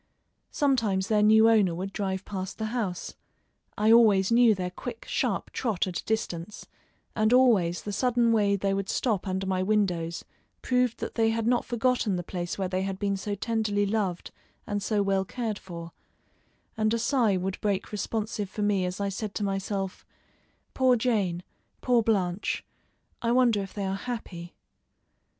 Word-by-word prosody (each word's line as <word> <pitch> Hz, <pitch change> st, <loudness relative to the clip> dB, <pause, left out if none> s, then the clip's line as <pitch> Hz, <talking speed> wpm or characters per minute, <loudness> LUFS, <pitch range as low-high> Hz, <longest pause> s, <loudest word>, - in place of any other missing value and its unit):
Sometimes 230 Hz, -, +1 dB
their 215 Hz, -1 st, +3 dB
new 220 Hz, +1 st, +6 dB
owner 205 Hz, -7 st, +4 dB
would 190 Hz, +3 st, -5 dB
drive 190 Hz, -2 st, -3 dB
past 190 Hz, -1 st, -5 dB
the 220 Hz, -, -3 dB
house; 200 Hz, -8 st, -3 dB, 0.6 s
I 215 Hz, +1 st, +3 dB
always 215 Hz, -4 st, +5 dB
knew 235 Hz, -2 st, +5 dB
their 180 Hz, -1 st, -3 dB
quick, 450 Hz, -, -7 dB
sharp -, -, -1 dB
trot 220 Hz, -8 st, -1 dB
at 180 Hz, -2 st, -3 dB
a -, -, -9 dB
distance, 210 Hz, -3 st, -3 dB, 0.5 s
and 215 Hz, 0 st, +2 dB
always 220 Hz, -10 st, +4 dB
the 205 Hz, -, -4 dB
sudden 240 Hz, +1 st, +2 dB
way 205 Hz, -2 st, +3 dB
they 195 Hz, 0 st, 0 dB
would 195 Hz, 0 st, -2 dB
stop 215 Hz, -6 st, 0 dB
under 190 Hz, +1 st, -2 dB
my 190 Hz, -1 st, 0 dB
windows 185 Hz, -5 st, 0 dB, 0.4 s
proved 250 Hz, -2 st, +1 dB
that -, -, -4 dB
they 225 Hz, -1 st, +2 dB
had 225 Hz, 0 st, -1 dB
not 240 Hz, +1 st, +2 dB
forgotten 240 Hz, -4 st, +1 dB
the 175 Hz, -, -3 dB
place 175 Hz, 0 st, -4 dB
where 190 Hz, -2 st, -1 dB
they 185 Hz, 0 st, -1 dB
had 195 Hz, 0 st, -3 dB
been 200 Hz, 0 st, -1 dB
so 205 Hz, +1 st, -3 dB
tenderly 210 Hz, -1 st, 0 dB
loved 195 Hz, -4 st, -2 dB, 0.3 s
and 205 Hz, 0 st, -2 dB
so 205 Hz, +1 st, +1 dB
well 195 Hz, -1 st, +1 dB
cared 220 Hz, 0 st, -4 dB
for, 170 Hz, -2 st, -9 dB, 0.8 s
and 215 Hz, +1 st, +1 dB
a -, -, 0 dB
sigh 230 Hz, -4 st, +2 dB
would 185 Hz, +1 st, -3 dB
break 200 Hz, -2 st, -1 dB
responsive 210 Hz, -1 st, -3 dB
from 210 Hz, +1 st, -2 dB
me 200 Hz, -3 st, +1 dB
as 180 Hz, +1 st, -4 dB
I 200 Hz, 0 st, -1 dB
said 200 Hz, +1 st, -5 dB
to 210 Hz, -, -2 dB
myself: 195 Hz, -1 st, -3 dB, 0.7 s
"Poor 260 Hz, -1 st, +4 dB
Jane, 205 Hz, -8 st, 0 dB, 0.4 s
poor 245 Hz, -2 st, +3 dB
Blanche! 200 Hz, -3 st, -1 dB, 0.6 s
I 235 Hz, -, +1 dB
wonder 240 Hz, -4 st, +3 dB
if 195 Hz, -, -8 dB
they 200 Hz, -2 st, -2 dB
are 190 Hz, -, -1 dB
happy." 195 Hz, -7 st, -6 dB
205 Hz, 170 wpm, -27 LUFS, 190-225 Hz, 0.8 s, new